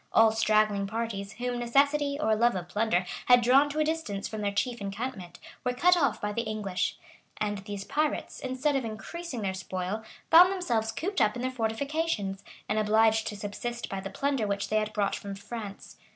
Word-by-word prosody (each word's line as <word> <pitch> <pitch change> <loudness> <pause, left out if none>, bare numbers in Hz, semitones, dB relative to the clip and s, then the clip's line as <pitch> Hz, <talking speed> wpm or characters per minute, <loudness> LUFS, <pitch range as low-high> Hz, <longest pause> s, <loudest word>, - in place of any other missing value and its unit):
All 225 0 +6
straggling 215 -2 +2
parties, 215 -2 -4
whom 245 +2 -3
necessity, 280 +4 +2
or 220 -8 +2
love 235 +1 +3
of 175 -2 -4
plunder, 205 -4 +1 0.2
had 245 -1 +7
drawn 270 +4 +5
to 295 - -5
a 310 - +3
distance 305 -11 -2
from 215 -1 -5
their 205 -1 0
chief 235 +3 -1
encampment, 200 -3 -5 0.3
were 250 0 -1
cut 355 +8 +5
off 280 -7 +1
by 210 0 -2
the 230 - 0
English;[] 210 -4 -2 0.4
and 205 -1 -1
these 200 0 -6
pirates, 300 +5 -1
instead 260 +3 -1
of 270 - +1
increasing 240 +4 -6
their 190 -1 -1
spoil, 190 +2 -4 0.3
found 355 +3 +9
themselves 235 - 0
cooped 360 - -2
up 210 0 +3
in 245 - -4
their 255 - 0
fortifications, 225 -3 -2 0.2
and 215 +1 +1
obliged 220 +1 +3
to 210 - -5
subsist 235 +4 -5
by 195 - -3
the 195 0 -6
plunder 270 +1 -1
which 200 0 -2
they 215 - +2
had 215 0 0
brought 205 -2 0
from 200 -1 -6
France. 205 0 -8
220 Hz, 195 wpm, -28 LUFS, 205-260 Hz, 0.4 s, found